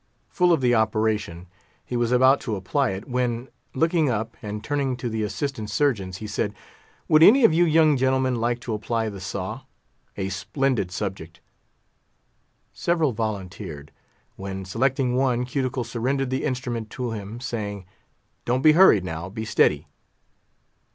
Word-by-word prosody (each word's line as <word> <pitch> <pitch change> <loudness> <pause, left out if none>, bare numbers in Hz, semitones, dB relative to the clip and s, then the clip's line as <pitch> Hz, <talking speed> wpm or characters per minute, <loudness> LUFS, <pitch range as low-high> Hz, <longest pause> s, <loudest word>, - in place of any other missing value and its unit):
Full 180 -1 +2
of 165 -5 +3
the 125 -1 +3
operation, 110 -6 0 0.4
he 125 - -5
was 120 0 0
about 130 +2 +5
to 110 - -3
apply 125 +8 0
it, 95 +2 -5
when, 125 -1 -2 0.3
looking 160 +1 +2
up, 110 0 -2
and 105 0 -6
turning 135 -1 -1
to 120 -1 -4
the 110 -1 -2
assistant 110 0 -3
surgeons, 105 -6 0
he 110 - -8
said, 105 -1 -2 0.5
"Would 155 0 +5
any 240 +10 +8
of 165 - +5
you 175 +2 +4
young 155 -2 +4
gentlemen 130 -1 +1
like 120 +1 0
to 120 -2 -4
apply 110 +1 -1
the 100 -2 -9
saw? 95 0 -5 0.6
A 95 -1 -2
splendid 105 +3 -1
subject!" 90 -4 -5 1.3
Several 165 -5 +1
volunteered; 95 -8 -5 0.5
when, 95 0 -6
selecting 125 +5 0
one, 125 -2 +1
Cuticle 130 -1 -2
surrendered 125 +3 -2
the 130 - -1
instrument 125 -5 -3
to 125 0 -4
him, 105 +1 -6
saying, 105 -6 -5 0.6
"Don't 125 +2 0
be 155 - +8
hurried, 155 - +6
now; 85 0 -5
be 110 +3 -5
steady." 105 - +2
120 Hz, 150 wpm, -24 LUFS, 105-130 Hz, 1.3 s, any